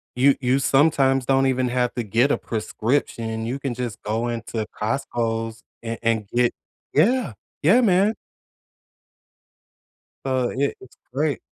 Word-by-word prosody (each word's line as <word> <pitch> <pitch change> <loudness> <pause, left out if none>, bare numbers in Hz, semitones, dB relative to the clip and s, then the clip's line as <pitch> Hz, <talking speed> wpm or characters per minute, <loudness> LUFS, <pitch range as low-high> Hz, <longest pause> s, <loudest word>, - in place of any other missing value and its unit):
You 135 +2 +5
you 130 +2 +2
sometimes 135 -2 +3
don't 135 0 +3
even 130 -1 +1
have 125 0 0
to 120 - -1
get 115 +7 +2
a - - +2
prescription. 115 0 -2
You 130 +4 -3
can 135 -3 -3
just 120 -3 -5
go 110 +3 -1
into 115 -2 -3
Costco's 115 -1 -2 0.2
and 115 0 -3
and 110 -3 0
get 120 0 +2 0.4
Yeah. 210 - +3 0.3
Yeah, 215 +11 +6
man. 200 0 +4 2.1
So, 130 -2 0
i 140 +2 0
it's 130 - -16 0.2
great. 145 +1 0
125 Hz, 135 wpm, -23 LUFS, 115-140 Hz, 2.1 s, Yeah